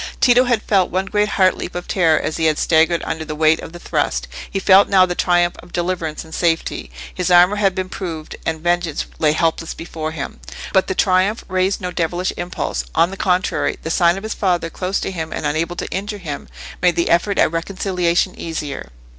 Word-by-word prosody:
Tito 250 Hz, 0 st, +5 dB
had 240 Hz, -3 st, +1 dB
felt 195 Hz, -3 st, +2 dB
one 185 Hz, +2 st, -1 dB
great 210 Hz, +1 st, +1 dB
heart 185 Hz, -3 st, +3 dB
leap -, -, -6 dB
of 175 Hz, -, -5 dB
terror 165 Hz, -4 st, +3 dB
as 155 Hz, -, -3 dB
he 165 Hz, -, 0 dB
had 155 Hz, -1 st, +3 dB
staggered 165 Hz, +1 st, +3 dB
under 160 Hz, -1 st, -3 dB
the 155 Hz, -1 st, -6 dB
weight 155 Hz, +1 st, +3 dB
of -, -, -8 dB
the 175 Hz, -, -9 dB
thrust: -, -, -1 dB, 0.2 s
he -, -, -3 dB
felt 195 Hz, +1 st, +5 dB
now 190 Hz, -2 st, +6 dB
the 180 Hz, -, -2 dB
triumph 175 Hz, -1 st, +2 dB
of 175 Hz, -, -14 dB
deliverance 175 Hz, -3 st, -2 dB
and 160 Hz, -, -14 dB
safety. 165 Hz, -, -1 dB, 0.2 s
His 180 Hz, 0 st, -2 dB
armour 180 Hz, +3 st, +6 dB
had 195 Hz, -3 st, +2 dB
been 185 Hz, 0 st, -2 dB
proved, 165 Hz, -5 st, -6 dB
and 160 Hz, -1 st, -2 dB
vengeance 175 Hz, -2 st, 0 dB
lay 150 Hz, -1 st, +3 dB
helpless 165 Hz, 0 st, -1 dB
before 160 Hz, -2 st, -5 dB
him. 140 Hz, -, -6 dB, 0.3 s
But 190 Hz, -, +3 dB
the 190 Hz, -, -2 dB
triumph 190 Hz, +4 st, +2 dB
raised 185 Hz, +2 st, 0 dB
no 180 Hz, 0 st, -3 dB
devilish 175 Hz, +1 st, -1 dB
impulse; 175 Hz, -, -3 dB
on 170 Hz, -, +3 dB
the -, -, -6 dB
contrary, 185 Hz, -1 st, 0 dB
the 160 Hz, -, -3 dB
sight 175 Hz, +1 st, +3 dB
of 195 Hz, -, -7 dB
his 220 Hz, -, -3 dB
father 175 Hz, -4 st, 0 dB
close 185 Hz, +1 st, -2 dB
to -, -, -3 dB
him 160 Hz, -3 st, -5 dB
and -, -, -4 dB
unable 160 Hz, +4 st, -1 dB
to -, -, -4 dB
injure 205 Hz, +2 st, -3 dB
him, 150 Hz, -, -6 dB, 0.3 s
made 180 Hz, -2 st, +3 dB
the 170 Hz, -, +1 dB
effort 175 Hz, +4 st, +2 dB
at -, -, +4 dB
reconciliation 180 Hz, +1 st, 0 dB
easier. 150 Hz, -, -5 dB
175 Hz, 215 wpm, -19 LUFS, 160-190 Hz, 0.3 s, now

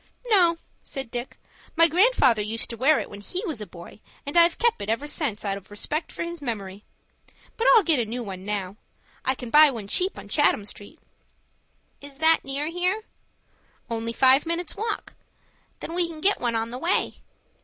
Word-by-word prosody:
"No," 360 Hz, -8 st, +4 dB, 0.2 s
said 270 Hz, -4 st, -7 dB
Dick; 245 Hz, +1 st, -5 dB, 0.4 s
"my 330 Hz, 0 st, +6 dB
grandfather 330 Hz, -, +4 dB
used 220 Hz, +3 st, -3 dB
to -, -, -5 dB
wear 270 Hz, +6 st, +3 dB
it -, -, -5 dB
when 205 Hz, 0 st, -10 dB
he 360 Hz, -, -4 dB
was 310 Hz, -, -4 dB
a 210 Hz, -, -6 dB
boy, 170 Hz, +3 st, -12 dB, 0.3 s
and 285 Hz, -, -6 dB
I've 340 Hz, 0 st, +5 dB
kep' 470 Hz, -, +1 dB
it 200 Hz, -, -5 dB
ever 230 Hz, +6 st, -1 dB
since 290 Hz, -8 st, -2 dB
out 195 Hz, -1 st, -1 dB
of 200 Hz, -, -13 dB
respect 300 Hz, +10 st, -3 dB
for -, -, -4 dB
his 340 Hz, -1 st, -6 dB
memory. 205 Hz, -6 st, -5 dB, 0.7 s
But 460 Hz, -, 0 dB
I'll 445 Hz, -, +6 dB
get 320 Hz, -7 st, +3 dB
a 235 Hz, -, 0 dB
new 240 Hz, +3 st, -4 dB
one 190 Hz, -3 st, -7 dB
now. 200 Hz, -1 st, -4 dB, 0.5 s
I 260 Hz, -, +1 dB
can 245 Hz, -3 st, -8 dB
buy 300 Hz, 0 st, +8 dB
one 225 Hz, -7 st, -6 dB
cheap 370 Hz, -, +1 dB
on -, -, -10 dB
Chatham 290 Hz, -8 st, +2 dB
Street." 210 Hz, +10 st, -10 dB, 1.0 s
"Is 285 Hz, -1 st, -10 dB
that 320 Hz, +1 st, +5 dB
near 275 Hz, +2 st, -2 dB
here?" 360 Hz, +6 st, -1 dB, 0.9 s
"Only 230 Hz, 0 st, -2 dB
five 265 Hz, +5 st, +4 dB
minutes' 335 Hz, 0 st, -2 dB
walk." 435 Hz, +1 st, -4 dB, 0.7 s
"Then 330 Hz, -, -6 dB
we 350 Hz, 0 st, +1 dB
can 320 Hz, -2 st, -9 dB
get 400 Hz, +5 st, +2 dB
one 235 Hz, -2 st, 0 dB
on 225 Hz, +1 st, -2 dB
the 250 Hz, -, -6 dB
way." 345 Hz, +5 st, 0 dB
275 Hz, 195 wpm, -25 LUFS, 225-335 Hz, 1.0 s, buy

